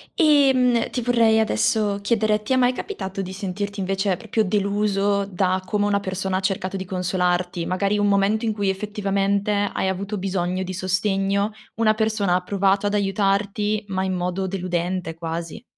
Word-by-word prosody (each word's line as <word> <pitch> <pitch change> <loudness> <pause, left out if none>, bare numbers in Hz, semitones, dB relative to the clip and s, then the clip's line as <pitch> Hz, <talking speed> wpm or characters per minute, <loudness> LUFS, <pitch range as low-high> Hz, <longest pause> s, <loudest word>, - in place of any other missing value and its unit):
Ehm, 265 - +4
ti 250 - -3
vorrei 230 -2 +3
adesso 205 - +1
chiedere: 215 0 +1
ti 215 - -1
è - - +4
mai 250 -1 +4
capitato 195 - -5
di 185 0 -6
sentirti, 200 +1 -4
invece, 195 0 0
proprio 220 +1 -1
deluso 200 0 +1
da 185 -1 0
come 205 +1 0
una 205 -1 +2
persona 190 -1 -2
ha - - 0
cercato 190 0 -2
di 190 - -5
consolarti? 180 -1 -1
Magari 200 +3 0
un 205 - +2
momento 200 +3 +2
in 220 - 0
cui, 205 -2 -1
effettivamente, 200 0 -1 0.2
hai 190 - 0
avuto 200 +2 -3
bisogno 185 -1 -1
di 185 0 -5
sostegno, 195 +2 0 0.2
una 215 -1 +3
persona 215 -4 +1
ha 180 - +1
provato 195 +1 +1
ad 205 - 0
aiutarti, 205 +1 0
ma 190 -1 -2
in 190 - -1
modo 180 +1 -2
deludente, 180 -2 -2
quasi? 165 +2 -5
195 Hz, 165 wpm, -23 LUFS, 185-210 Hz, 0.2 s, Ehm